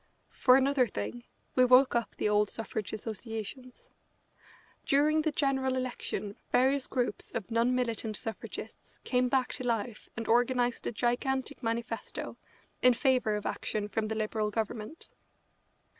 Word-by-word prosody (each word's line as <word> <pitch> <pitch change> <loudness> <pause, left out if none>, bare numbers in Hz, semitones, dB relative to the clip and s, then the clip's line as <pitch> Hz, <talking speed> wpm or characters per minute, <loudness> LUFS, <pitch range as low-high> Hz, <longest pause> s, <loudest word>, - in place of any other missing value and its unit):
For 255 0 +5
another 270 -1 +3
thing, 110 - -5 0.3
we 255 - +5
woke 255 +1 +6
up 235 -1 -1
the - - 0
old 210 0 +3
suffrage 220 -3 -4
associations. 225 - -6 0.9
During 300 +3 +3
the 310 0 0
general 265 -3 +1
election 245 -5 -3
various 265 +2 +3
groups 245 -5 -2
of 230 0 -4
non 235 +2 +3
militant 225 -3 -1
suffragists 225 - -7
came 250 -1 +1
back 260 -1 +1
to - - -4
life 230 -2 -2
and 230 - -4
organised 245 +1 +2
a - - -1
gigantic 255 +4 -1
manifesto 230 -1 -3 0.5
in 250 -1 +6
favour 250 -5 +2
of 210 - -4
action 210 -1 -2
from 215 +1 -1
the 220 - -2
Liberal 215 0 -1
Government. 220 +6 -4
240 Hz, 140 wpm, -30 LUFS, 220-255 Hz, 0.9 s, woke